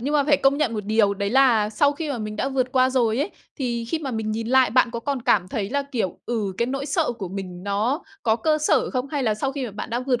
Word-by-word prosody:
nhưng 285 +5 -2
mà 285 -2 +3
phải 290 -1 +4
công 275 +1 +3
nhận 290 -7 +1
một 210 -2 -3
điều 210 -1 +2
đấy 200 0 -2
là 235 -5 +4
sau 285 +6 +3
khi 300 0 -4
mà 255 - -2
mình 215 -1 -5
đã 265 - -1
vượt 260 -2 -1
qua 255 0 +4
rồi 240 -3 +1
ấy, 295 +8 -1 0.3
thì 235 -3 -2
khi 315 +8 -2
mà 280 -4 -4
mình 220 -2 -2
nhìn 225 +1 -3
lại 260 -1 +4
bạn 250 0 +3
có 235 0 -4
còn 275 0 -3
cảm 190 -5 +2
thấy 205 +1 -3
là, 280 +1 0
kiểu, 240 -10 -3
ừ, 215 -5 -1
cái 235 - +1
nỗi 275 +2 -3
sợ 305 -2 0
của 190 -4 -4
mình 185 -2 -7
nó 210 - 0 0.2
có 220 -1 +2
cơ 305 +6 +1
sở 305 - +2
không? 255 0 -2
Hay 285 -1 -2
là 220 -4 +1
sau 270 +5 -2
khi 275 -2 -3
mà 225 - -6
bạn 210 - -6
đã 240 +1 -1
vượt 255 -2 0
245 Hz, 295 wpm, -23 LUFS, 215-275 Hz, 0.3 s, phải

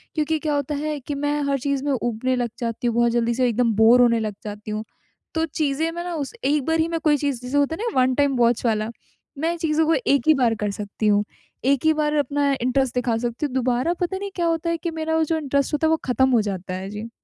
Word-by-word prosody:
क्योंकि 315 0 +1
क्या 300 -1 -1
होता 285 +1 -2
है 300 +1 -3
कि 280 +2 -5
मैं 290 +1 -1
हर 275 - +2
चीज़ 275 +1 -1
में 290 - +1
ऊबने 240 +2 -1
लग 245 -1 -1
जाती 235 0 -2
हूँ, 235 - 0
बहुत 235 0 +3
जल्दी 235 0 +1
से 250 +1 +2
एकदम 235 0 +1
बोर 225 +3 +6
होने 235 -1 +4
लग 215 -2 -3
जाती 210 0 -7
हूँ। 215 0 -3 0.5
तो 320 - +1
चीज़ें 310 0 -1
मैं 345 +1 -5
ना 355 -1 -4
उस 285 -4 -4
एक 285 -1 +1
बार 325 0 +1
ही 320 - +2
में 330 -1 -2
कोई 300 -2 +4
चीज़ 280 -4 -2
जैसे 250 +3 -2
होता 285 +3 +2
है 420 - -6
ना 260 - +1
वन 255 0 +3
टाइम 285 -1 +2
वॉच 240 0 +2
वाला, 215 -1 +1 0.5
मैं 325 +4 0
चीज़ों 320 -1 +1
को 325 - +4
एक 280 +3 +2
ही 315 - +8
बार 245 -5 +2
कर 205 - 0
सकती 205 +1 -3
हूँ। 205 0 +4 0.4
एक 275 +2 +2
ही 315 - +5
बार 300 -1 0
अपना 285 -1 +1
इंटरेस्ट 255 +1 +1
दिखा 245 -2 +1
सकती 240 +4 -2
हूँ, 280 - -4
दोबारा 255 +5 +1
पता 360 +2 -1
नहीं 400 +1 -5
क्या 345 - 0
होता 330 0 0
है 335 - 0
कि 340 +1 -4
मेरा 320 0 -1
जो 320 +1 0
इंटरेस्ट 280 -1 -1
होता 300 +2 +2
है - - +2
वो 320 - +3
ख़त्म 260 +1 +2
हो 235 -3 +4
जाता 190 -3 -4
है। 190 +1 -5
जी। 210 +3 -6
275 Hz, 265 wpm, -23 LUFS, 235-310 Hz, 0.5 s, ही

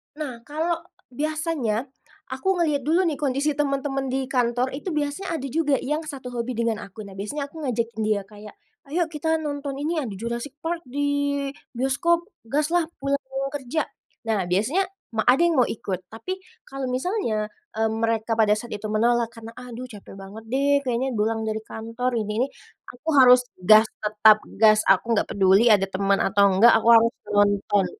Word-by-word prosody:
Nah, 280 -6 -5
kalau 325 +3 -1 0.3
biasanya, 285 -4 -2 0.4
aku 260 +8 -5
ngelihat 300 -5 +1
dulu 340 +4 +3
nih 320 -5 -1
kondisi 285 +1 0
temen-temen 275 -1 -1
di 265 +1 -1
kantor 245 0 +1
itu 295 +7 -5
biasanya 300 +5 -2
ada 275 -2 -5
juga 295 -1 +2 0.2
yang 305 +1 0
satu 265 -4 -7
hobi 240 +1 -3
dengan 230 -1 0
aku. 205 +1 -9
Nah, 200 - -11
biasanya 280 +9 -3
aku 325 - -10
ngajakin 230 -2 -2
kayak - - 0
dia 210 -2 +1
kayak, 210 +1 -13 0.3
"Ayo 340 +5 +1
kita 320 +1 0
nonton 285 -2 -4
ini 310 +4 -1
yang 270 - -3
di 205 - -6
Jurassic 235 +6 -5
Park 335 +1 -2
di 285 +1 -1 0.2
bioskop, 305 +7 +1 0.2
gas 295 +6 0
lah 345 -2 +2
pulang 275 +1 -1 0.3
kerja," 290 +2 -2 0.4
nah 220 -3 +1
biasanya, 265 - +1 0.3
ma 220 - +1
ada 255 - +6
yang 340 - +3
mau 240 - +1
ikut 190 -4 -4
tapi 225 +12 -5 0.3
kalau 270 -1 -5
misalnya, 255 - -1 0.3
mmm, 220 0 +1
mereka 225 0 0
pada 215 -2 +3
saat 235 +2 -7
itu 210 +1 -5
menolak 235 +2 +2
karena, 230 -1 -11
"Aduh 250 0 -8
capek 210 -6 -12
banget 195 +3 -10
deh 275 +3 +2
kayaknya 255 0 -1
pulang 220 +1 0
dari 220 0 -2
kantor 230 +3 -4
ini 210 -1 -3
ini," 265 - +2 0.4
aku 245 +6 -15
harus 250 -1 +7 0.2
gas, 215 +4 +7 0.2
tetap 215 0 +5 0.2
gas 215 -1 +6
aku 230 +5 +4
enggak 210 - +1
peduli 195 +4 +4
ada 200 -2 +5
teman 195 +1 +1
atau 200 0 +4
enggak 235 +4 +7
aku 225 0 +2
harus 230 +1 +5 0.2
nonton. 205 -1 +3
245 Hz, 180 wpm, -24 LUFS, 220-285 Hz, 0.4 s, harus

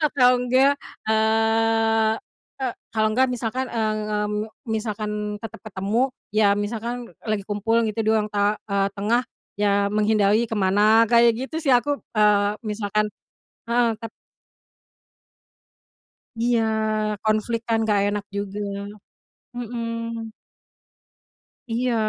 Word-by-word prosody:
Atau 255 -4 +4
enggak, 260 +3 +3 0.3
eee 225 0 +2 0.5
eee, 250 -3 -1 0.2
kalau 215 -1 +3
enggak 260 +4 +3
misalkan, 250 +1 -2
eee 220 -3 -1
eee, 210 0 -1 0.4
misalkan 215 -1 -2 0.3
tetep 225 - -8
ketemu, 220 +6 -1 0.2
ya 205 -1 +4
misalkan 230 +4 -4 0.2
lagi 215 -2 -1
kumpul 215 +3 0
gitu, 215 - -10
di - - +3
ruang 215 -1 0
ta 205 0 +2 0.2
eee, 200 0 +2
tengah. 230 +5 0 0.3
Ya 200 -1 +2
menghindari 210 +1 +2
ke 230 - -9
mana 210 +3 +4
kayak 235 0 +6
gitu 315 - -7
sih 275 - +4
aku, 285 +4 +3 0.2
eee, 210 -1 +3
misalkan 210 -1 -1 0.6
heeh, 235 -1 +2
tap 225 0 -7 2.3
Iya, 235 0 +2 0.6
konflik 215 +2 0
kan 225 -1 +2
nggak 210 -2 +2
enak 205 0 -2
juga, 200 0 -4 1.0
Mhm. 230 -1 -4 1.4
Iya, 240 +1 0
220 Hz, 115 wpm, -23 LUFS, 210-235 Hz, 2.3 s, kayak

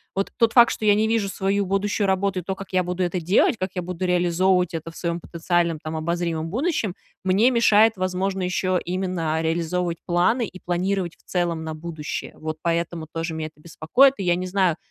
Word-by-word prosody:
Вот 195 +1 -1
тот 230 -1 +3
факт, 240 -1 +7
что 215 - -4
я 205 -1 +6
не 215 +1 +2
вижу 220 -3 +1
свою 195 +1 0
будущую 200 +1 0
работу 190 0 +1
и - - -4
то, 190 +2 -3
как 195 0 -10
я 185 0 +3
буду 180 +1 -2
это 180 0 -1
делать, 185 +7 +3
как 185 - -1
я 180 - -2
буду 180 +1 -4
реализовывать 180 0 +2
это 165 0 -5
в 165 - -14
своем 170 -1 -2
потенциальном, 170 0 0
там, 155 +1 -6
обозримом 165 0 -2
будущем, 230 - -1 0.3
мне 195 +7 +4
мешает, 225 -2 +5
возможно, 185 +1 -1
еще 185 0 0
именно 175 -3 -2
реализовывать 170 +1 -1
планы 180 +7 +2
и 185 - -12
планировать 180 0 -1
в - - -31
целом 170 -3 -1
на 160 0 -5
будущее. 155 -1 -6
Вот 155 0 -5
поэтому 170 -1 -1
тоже 165 0 -3
мя 160 0 -3
это 155 -1 -11
беспокоит. 210 - +3
И 195 - -4
я 175 -1 +3
не 180 +1 -3
знаю, 185 -3 +1
180 Hz, 205 wpm, -23 LUFS, 170-195 Hz, 0.3 s, факт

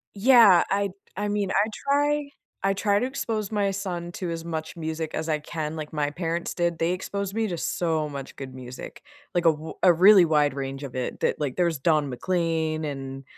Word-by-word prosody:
Yeah, 210 -5 +7
I'd 200 0 0 0.2
I 205 +2 -2
mean, 205 -2 -1
I 210 - +3 0.2
try 290 0 +2 0.3
I 195 0 +3
try 200 +1 +1
to - - 0
expose 225 -6 -3
my 205 -2 +1
son 180 -3 -4
to 180 -1 -4
as 165 0 -5
much 160 -2 -4
music 160 -1 -4
as 160 - -3
I 155 -1 +1
can, 155 0 -5
like 155 -1 -6
my 150 -2 0
parents 170 +1 -3
did, 170 -1 0
they 165 +2 +1
exposed 195 +2 -3
me 225 0 0
to 175 -4 -3
so 160 -2 -1
much 140 -2 -7
good 135 -2 -8
music, 130 -1 -9 0.3
like 175 -1 0
a 165 - +7
w 155 +1 -7
a 180 - +7
really 185 +2 +7
wide 150 -3 +2
range 135 0 -5
of 130 -3 -7
it 130 -1 -4
that - - 0
like, 145 -4 -2
there's 170 -4 +1
Don 150 -1 +2
McLean 160 +1 -1
and, 135 -1 -6
170 Hz, 205 wpm, -25 LUFS, 150-195 Hz, 0.3 s, Yeah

